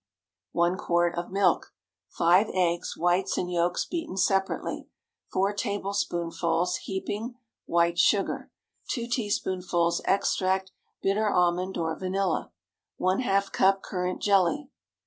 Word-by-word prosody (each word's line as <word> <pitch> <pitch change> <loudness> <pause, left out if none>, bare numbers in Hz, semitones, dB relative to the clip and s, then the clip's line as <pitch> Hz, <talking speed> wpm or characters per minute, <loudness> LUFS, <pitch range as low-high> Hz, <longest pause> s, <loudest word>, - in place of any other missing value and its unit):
✠ - - -60 0.5
1 175 +2 +2
quart 175 0 +1
of 175 0 -4
milk. 195 0 +1 0.3
5 180 +5 +3
eggs—whites 175 +1 +1
and 180 0 -2
yolks 175 0 +1
beaten 330 - -4
separately. 195 0 0 0.4
4 195 +2 +1
tablespoonfuls 180 -4 -1
(heaping) 210 +5 -4 0.3
white 170 0 +2
sugar. 200 +2 +2 0.4
2 235 -4 -1
teaspoonfuls 185 -7 0
extract 190 -1 +1 0.3
bitter 210 +2 +2
almond 180 0 +1
or 160 -1 -1
vanilla. 190 -1 -1 0.5
½ 195 0 +1
cup 195 +1 +3
currant 180 -1 -3
jelly. 205 +9 +2
185 Hz, 110 wpm, -27 LUFS, 175-200 Hz, 0.5 s, 5